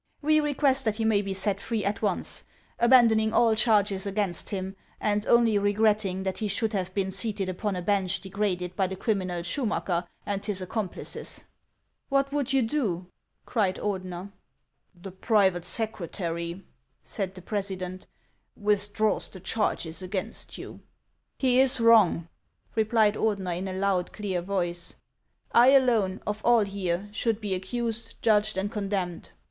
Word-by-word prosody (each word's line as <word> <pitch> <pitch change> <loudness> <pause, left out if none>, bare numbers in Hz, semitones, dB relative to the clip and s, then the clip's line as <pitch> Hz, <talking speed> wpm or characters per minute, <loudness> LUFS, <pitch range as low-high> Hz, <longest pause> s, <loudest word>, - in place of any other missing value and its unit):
We 310 +1 +4
request 280 -2 +2
that 215 -2 +1
he 225 0 -1
may 215 -2 +3
be 195 -1 -4
set 195 +1 -1
free 225 -4 -2
at 200 +1 -1
once, 200 -4 -1 0.3
abandon 235 -2 +6
ing 220 0 0
all 230 -1 +4
charges 205 -3 +2
against 200 -3 -1
him, 190 -1 -4 0.2
and 210 0 0
only 230 -3 +4
regretting 205 -2 +1
that 190 -1 -3
he 215 - -1
should 220 +2 -1
have 190 -2 -2
been 190 -1 0
seated 195 0 -2
upon 195 +2 -2
a 180 - -4
bench 195 -1 +1
degraded 190 -2 -2
by 190 0 +1
the 190 - -5
criminal 185 -5 -1
Schumacker 180 -5 -1 0.2
and 200 -1 -2
his 205 -3 -1
accomplices." 190 +1 -4 0.3
" - - -50
What 275 0 +2
would 285 -2 -1
you 270 -2 +3
do? 220 - -1 0.2
" - - -49
cried 200 -6 +1
Ordener. 185 -1 -4 0.3
" - - -45
The 195 - -6
private 190 -2 +2
secretary," 170 -4 -3 0.4
said 195 -4 -4
the 185 - -9
president, 185 -2 -4 0.3
" - - -46
withdraws 205 0 0
the 190 - -10
charges 175 -4 -1
against 190 +3 -4
you." - - -9 0.3
" - - -49
He 255 -1 +3
is 260 -1 +5
wrong," 220 -7 +5 0.5
replied 220 -1 +3
Ordener, 195 -6 -1
in 185 +3 -4
a 190 - -4
loud, 190 -1 0
clear 195 -4 -2
voice; 175 -2 -3 0.3
" - - -42
I 240 +1 +6
alone 235 -8 +4
of 210 +1 -3
all 240 -1 +5
here 195 -1 -2
should 225 0 0
be 205 -3 -2
accused, 230 +5 -3
judged, 215 -2 +3
and 200 +2 -1
con 205 -3 -3
demned." 180 -4 -3
205 Hz, 165 wpm, -27 LUFS, 185-220 Hz, 0.5 s, abandon